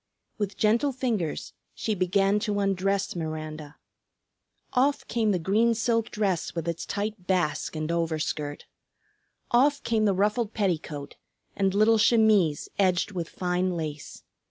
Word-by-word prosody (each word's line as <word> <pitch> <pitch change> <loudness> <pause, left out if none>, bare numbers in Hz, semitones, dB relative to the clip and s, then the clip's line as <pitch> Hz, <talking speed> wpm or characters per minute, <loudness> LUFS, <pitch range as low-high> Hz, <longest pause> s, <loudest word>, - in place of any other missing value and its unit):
With 200 -2 -2
gentle 230 +7 +2
fingers 230 - -2 0.2
she 220 - -1
began 195 +2 +2
to 210 -2 -1
undress 195 0 0
Miranda. 155 -2 -5 1.0
Off 275 +3 +2
came 225 -2 +1
the 195 - +2
green 215 +7 +2
silk 230 0 0
dress 195 -7 -1
with 165 0 -3
its 170 -1 -3
tight 205 -2 -4
"basque" 175 -5 0
and 155 0 -2
overskirt. 155 -3 -2 0.9
Off 280 +4 +3
came 220 -2 +1
the 200 -2 +2
ruffled 210 +3 0
petticoat 160 -8 -2 0.4
and 195 0 +1
little 215 +2 +4
chemise 215 -9 +4
edged 185 +1 +2
with 175 -4 -4
fine 180 0 -1
lace. 150 -2 -6
195 Hz, 130 wpm, -27 LUFS, 170-220 Hz, 1.0 s, little